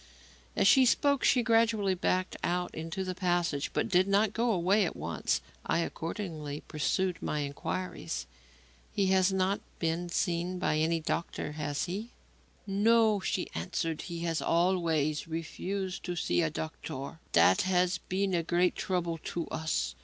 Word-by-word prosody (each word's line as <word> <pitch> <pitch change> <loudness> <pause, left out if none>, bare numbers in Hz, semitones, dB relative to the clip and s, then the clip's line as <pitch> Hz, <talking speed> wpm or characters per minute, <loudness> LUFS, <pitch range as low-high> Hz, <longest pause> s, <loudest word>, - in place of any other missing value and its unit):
As - - +4
she 265 - +7
spoke, 280 +2 +3
she 250 -3 +4
gradually 225 -4 +3
backed 185 0 0
out 180 0 -1
into 165 +4 -4
the 185 -1 -3
passage 175 -5 0
but - - 0
did 185 +1 +3
not 200 +1 +3
go 235 +1 +1
away 195 +2 +3
at 175 - -2
once. - - -1 0.2
I - - +1
accordingly 160 -4 -4
pursued 175 +4 0
my 150 - -1
inquiries. 145 +6 -4 0.7
"He 200 - +1
has 190 0 +4
not 190 +1 +1 0.2
been 165 +1 -1
seen 175 +1 -1
by 155 -4 +1
any 165 +1 +2
doctor, 160 -1 -3
has 145 -1 -2
he?" 200 +6 -4 0.6
"No," 215 +1 +4
she 190 -1 -2
answered, 155 - -2
"he 170 -1 -5
has 165 -1 -1
always 165 -4 +1
refused 185 +4 -4
to 180 - -3
see 175 - +1
a 165 - +1
doctor. 155 -1 -6
That 95 - +5
has 180 -1 +2
been 190 +2 -1
a 170 - +2
great 175 +2 +2
trouble 175 -3 -1
to 170 -2 -3
us. 160 - -1
180 Hz, 155 wpm, -30 LUFS, 165-195 Hz, 0.7 s, she